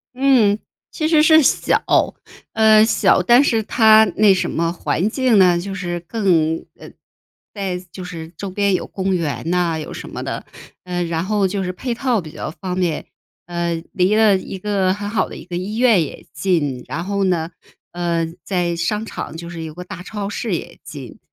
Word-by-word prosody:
嗯。 245 -6 +3 0.3
其 310 - -2
实 315 -1 +4
是 315 0 +6
小， - - +2 0.7
呃， 220 -1 +6
小， 205 -4 +3
但 240 +8 +5
是 225 -5 +2
它 220 0 +5
那 205 -2 +5
什 185 - -1
么 165 0 0
环 180 +3 -1
境 255 -5 +2
呢， 180 -2 +5
就 195 +2 -5
是 175 -3 -3
更 170 -4 0
呃， - - -11 0.6
在 195 -3 -3
就 185 - -8
是 165 -3 -7
周 200 - -5
边 200 +1 +1
有 - - -1
公 190 0 -2
园 150 -5 -3
呐 175 -2 +1
有 155 - -7
什 - - -8
么 - - -6
的。 - - -5 0.4
呃 180 -1 -2
然 165 -1 -2
后 205 -1 +1
就 195 +1 -3
是 180 - -2
配 245 +6 -3
套 240 -1 0
比 160 -4 -8
较 - - -5
方 180 +2 -5
便， 170 -4 -1 0.4
呃 170 -1 -2 0.2
离 190 +1 +2
了 215 -3 +5
1 190 - -7
个 195 -1 0
很 205 +1 -5
好 215 - 0
的 - - -9
1 - - -10
个 180 - -6
医 195 +4 -4
院 230 -5 +4
也 145 - -9
近。 145 -10 -1
然 - - -4
后 200 +1 -1
呢， 170 -3 0 0.4
呃， 170 -1 -1 0.2
在 175 -3 -1
商 210 +6 -1
场 160 - -7
就 170 0 -8
是 165 -1 -7
有 155 -1 -7
个 180 - -7
大 180 - -9
超 200 +2 -5
市 210 -1 -2
也 - - -7
近， 135 -6 -10
185 Hz, 205 characters per minute, -20 LUFS, 170-215 Hz, 0.7 s, 是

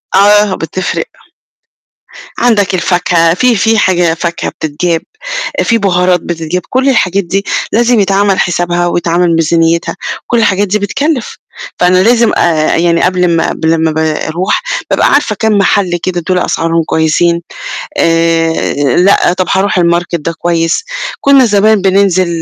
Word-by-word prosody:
آه 205 0 +4
بتفرق. 185 - -4 1.3
عندك 210 -5 +1
الفاكهة، 175 -2 +1
في 240 +5 +2
في 225 +2 +1
حاجة 175 -4 +2
فاكهة 170 0 -3
بتتجاب، 160 +2 -3 0.6
في 230 - +1
بهارات 180 -3 +1
بتتجاب، 165 +1 -4
كُل 260 +2 +1
الحاجات 200 -6 +1
دي 195 +3 -2 0.3
لازم 235 0 +2
يتعمل 195 0 +1
حسابها 175 0 0
ويتعمل 170 0 0
ميزانيتها، 165 +1 0 0.3
وكُل 240 - -1
الحاجات 205 -2 +1
دي 210 +3 0
بتكلِّف. 275 +5 -2 0.4
فأنا 185 +1 +3
لازم 235 0 +3
أ 160 -3 +1
يعني 170 0 +1
قبل 180 0 +1
ما 165 - 0
قبل 160 0 0
ما 160 0 0
ب - - -8
باروح، 160 +4 -1 0.3
بابقى - - +2
عارفة 280 -7 +1
كام 220 -2 +1
محل 190 -2 +1
كده 180 -2 -2
دُولَة 180 -1 +1
أسعارهم 165 0 -1
كويسين، 170 +2 0 0.6
آآ 165 0 +1 0.2
لأ، 180 -1 +3
طب 185 -1 -2
هاروح 195 -1 +1
الmarket 170 0 0
ده 165 +2 -3
كويس. 165 - -1 0.4
كنا 275 -2 +4
زمان 210 -1 +2
بننزل 185 -3 +1
180 Hz, 140 wpm, -11 LUFS, 170-200 Hz, 1.3 s, آه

